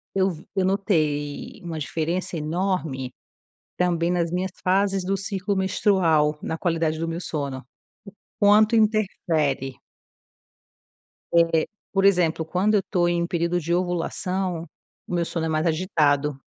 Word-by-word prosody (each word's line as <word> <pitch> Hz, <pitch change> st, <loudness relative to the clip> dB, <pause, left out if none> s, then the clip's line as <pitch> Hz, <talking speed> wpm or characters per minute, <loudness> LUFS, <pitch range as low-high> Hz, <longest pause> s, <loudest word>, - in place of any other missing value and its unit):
eu 190 Hz, 0 st, +3 dB
vi 165 Hz, -1 st, -11 dB
eu 190 Hz, -1 st, +2 dB
notei 155 Hz, -7 st, -1 dB
uma 165 Hz, -2 st, -5 dB
diferença 165 Hz, +4 st, -2 dB
enorme 160 Hz, -5 st, -2 dB, 0.6 s
também 175 Hz, -1 st, +1 dB
nas 170 Hz, -2 st, 0 dB
minhas 180 Hz, +1 st, -1 dB
fases 195 Hz, +1 st, +2 dB
do 195 Hz, +2 st, 0 dB
ciclo 195 Hz, +1 st, -2 dB
menstrual, 175 Hz, -6 st, +2 dB
na 160 Hz, -, -3 dB
qualidade 165 Hz, -2 st, 0 dB
do 165 Hz, -, -2 dB
meu 165 Hz, +1 st, -3 dB
sono, 140 Hz, -6 st, -4 dB, 0.8 s
o -, -, +3 dB
quanto 215 Hz, +2 st, +6 dB
interfere. 165 Hz, -, +1 dB, 1.7 s
É, 160 Hz, -1 st, +2 dB, 0.3 s
por 195 Hz, 0 st, +2 dB
exemplo, 175 Hz, -4 st, +3 dB
quando 185 Hz, +6 st, +1 dB
eu 200 Hz, -, +2 dB
tô 175 Hz, -1 st, +2 dB
em 175 Hz, 0 st, +1 dB
um -, -, -2 dB
período 170 Hz, 0 st, 0 dB
de 170 Hz, +1 st, -2 dB
ovulação, 180 Hz, 0 st, -1 dB, 0.4 s
o -, -, -6 dB
meu 175 Hz, -1 st, +1 dB
sono 165 Hz, -1 st, -3 dB
é -, -, -1 dB
mais 155 Hz, +1 st, 0 dB
agitado. 150 Hz, -5 st, +1 dB
175 Hz, 140 wpm, -24 LUFS, 160-190 Hz, 1.7 s, quanto